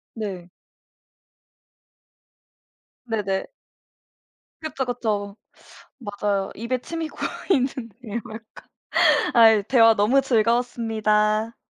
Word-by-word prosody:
네. 190 -5 -6 2.6
네네. 205 -4 -2 1.1
그쵸, 305 -4 -3
그쵸. 215 -4 -3 0.6
맞아요. 205 -3 -2
입에 235 +3 -2
침이 330 +1 -5
고이는데요 250 - -3
약간. 225 0 -7 0.9
아이 220 -3 +6
대화 225 -1 +5
너무 240 +7 +3
즐거웠습니다. 225 -2 +1
225 Hz, 170 characters per minute, -23 LUFS, 210-245 Hz, 2.6 s, 아이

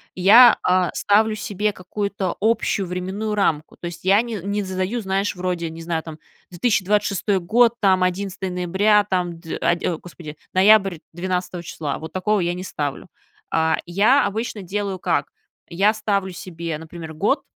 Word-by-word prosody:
Я, 220 +7 +7
а, 180 -1 +2
ставлю 215 +2 +2
себе 210 0 -2
какую-то 195 0 -4
общую 215 -3 +1
временную 190 +4 -3
рамку, 160 -6 0
то 175 - -7
есть 170 +1 -9
я 200 +3 +5
не 235 -2 -5
не 200 +3 -2
задаю, 190 +5 -2
знаешь, 195 0 -1
вроде, 180 -2 -2
не 165 +1 -9
знаю, 165 -1 -2
там, 160 -1 -9 0.3
2026 200 0 +1
год, 230 +6 +4
там, 190 -2 +3
11 190 +1 -2
ноября, 190 +4 +2
там, 175 -2 -1
д 165 -2 -5
а, 175 - +3
ди 170 - -6 0.2
господи, 155 -4 -10 0.2
ноябрь 195 -3 +5
12 180 0 -3
числа, 155 -4 -5
вот 160 - -9
такого 200 +2 +1
я 175 0 0
не 180 +1 -6
ставлю, 145 -6 -4 0.4
а. 160 0 +2
Я 205 +11 +3
обычно 215 +1 -3
делаю 195 +1 -3
как: - - 0 0.4
я 195 +5 +2
ставлю 200 -3 -1
себе, 170 -3 -6
например, 160 0 -9
год, 210 - +1
185 Hz, 160 wpm, -22 LUFS, 175-205 Hz, 0.4 s, Я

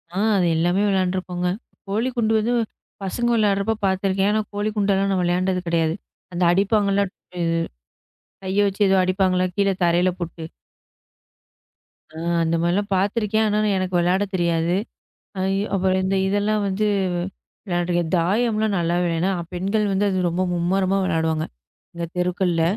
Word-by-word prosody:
ஆ, - - -3 0.2
அது 180 - +2
எல்லாமே 175 +4 +2
விளையாண்டிருக்கோங்க. 185 -2 -1 0.4
கோலிகுண்டு 225 +2 0
வந்து 220 +3 0 0.5
பசங்க 240 +5 -1
விளையாடுறப்ப 205 0 +2
பாத்துருக்கேன், 190 +1 +1
ஆனா, 215 +1 +2
கோலிகுண்டுல்லாம் 205 -1 0
நான் 185 -1 +1
விளையாண்டது 180 +1 0
கிடையாது. 165 -1 +1 0.4
அந்த 175 - 0
அடிப்பாங்கல்ல, 200 +1 +2
இது 185 - -17 1.3
கைய 190 +2 +1
வச்சு 200 +1 -4
ஏதோ 195 - +4
அடிப்பாங்கல்ல, 185 0 +2
கீழ 200 -1 +3
தரைய்ல 175 +2 +3
போட்டு? 170 -1 -6 1.7
ஆ, - - -8 0.3
அந்த 165 0 +1
மாதிரி 170 +1 +1
எல்லாம் 205 +1 -1
பாத்துருக்கேன். 210 +2 +1
ஆனா 210 - +1 0.2
எனக்கு 185 -1 -2
விளையாட 180 +3 +2
தெரியாது. 170 -1 +1 0.6
அ - - -1 0.3
அப்புறம் 190 0 +2
இந்த 190 +1 0
இதெல்லாம் 205 +2 +1
வந்து 200 +2 0 0.8
விளையாடுற 175 -1 0 0.2
தாயம் 210 +7 +1
எல்லாம் 215 -2 +1
நல்லா 170 0 0
விளையாடுனா 170 +2 0 0.2
பெண்கள் 200 +4 0
வந்து 195 +1 +1
அது 190 - 0
ரொம்ப 175 +2 -1
மும்முரமா 185 +3 +1
விளையாடுவாங்க. 160 -3 0 0.5
இந்த 170 0 -4
தெருக்கள்ல 180 -1 +1
190 Hz, 135 wpm, -22 LUFS, 175-205 Hz, 1.7 s, ஏதோ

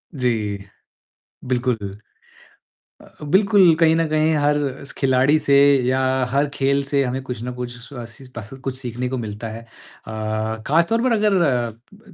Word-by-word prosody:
जी। 110 -6 -1 0.8
बिल्कुल 125 -1 0 1.2
अ, - - -16 0.2
बिलकुल, 190 +2 +5
कहीं 160 0 +4
न 165 0 +1
कहीं 155 +1 +2
हर 145 0 +2 0.4
खिलाड़ी 135 +2 +3
से 140 -2 +2 0.3
या 130 +1 +2 0.3
हर 140 +2 +2
खेल 140 0 +1
से 140 0 +1
हमें 130 +1 -2
कुछ 125 -4 -6
न 125 +1 -4
कुछ 125 +1 -8
अ, 120 -3 -6
सी 120 +3 -12
पस 110 -2 -7
कुछ 135 -1 -3
सीखने 125 -1 -4
को 130 - -3
मिलता 110 -1 -5
है। 110 +1 -8
अ, 115 -1 -16 0.6
खासतौर 170 +10 +2
पर 255 - +2
अगर 175 - -1
135 Hz, 150 wpm, -21 LUFS, 120-155 Hz, 1.2 s, बिलकुल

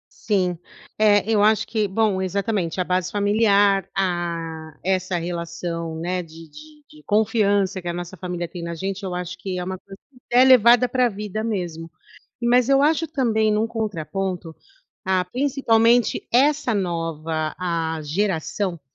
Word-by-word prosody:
Sim, 185 -5 0 0.4
é, 210 0 +3
eu 215 -2 +3
acho 215 0 +3
que 215 -2 0
bom, 195 -1 +1
exatamente 190 -2 -2
a - - +2
base 180 -1 -1
familiar, 205 -2 +3
ah, 170 -4 -3
essa 185 -1 0
relação, 170 -1 -4
né, 180 +2 -2
de 165 0 -13
de 305 - -15
de 305 0 -18
confiança 205 -3 +2
que 175 - -8
a 170 - -1
nossa 175 +1 -6
família 175 0 -4
tem 170 +1 -8
na 170 0 -5
gente, 195 +4 -4
eu 180 -2 -4
acho 180 0 -5
que 185 -2 -4
é 180 - -3
uma 185 +1 -4
coisa 195 -1 -13
que 250 - -21 0.2
é 255 - +8
levada 245 -1 +6
pra 250 0 +2
a - - -2
vida 210 +1 -5
mesmo. 175 -7 -4 0.5
Mas 245 +2 +3
eu 275 +1 +5
acho 320 +2 +2
também, 225 -8 +1
num 215 +1 +1
contraponto, 190 -5 -4 0.5
ah, 185 -1 +2
principalmente 245 -3 +2
essa 280 0 +3
nova, 165 -4 -2
ah, 165 -3 -2
geração, 175 +1 -2
190 Hz, 160 wpm, -22 LUFS, 170-220 Hz, 0.5 s, é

